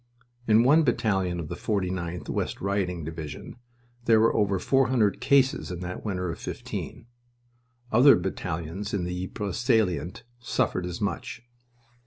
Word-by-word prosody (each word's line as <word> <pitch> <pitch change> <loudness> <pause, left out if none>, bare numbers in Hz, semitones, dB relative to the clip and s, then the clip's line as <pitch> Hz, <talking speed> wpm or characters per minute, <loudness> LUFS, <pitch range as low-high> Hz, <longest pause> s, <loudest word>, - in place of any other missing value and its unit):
In 110 +1 +5
one 150 +6 +6
battalion 95 - 0
of 80 - -5
the 85 - -5
49th 90 -3 -3
(West - - -2
Riding) 95 -4 -1
Division 80 - -7 0.5
there 115 -1 +5
were 115 - +3
over 100 -2 +2
four 135 +7 +2
hundred 110 -6 +1
cases 135 -1 +3
in 90 -2 -5
that 90 0 -6
winter 90 -4 -2
of 80 - -8
'15. - - -6 0.9
Other 130 +6 +7
battalions 90 +2 -4
in 95 - -1
the 90 +1 -3
Ypres 100 -1 -4
salient 110 - +1 0.2
suffered 115 -6 -1
as 90 +3 -6
much. 105 +3 -3
95 Hz, 145 wpm, -26 LUFS, 90-115 Hz, 0.9 s, Other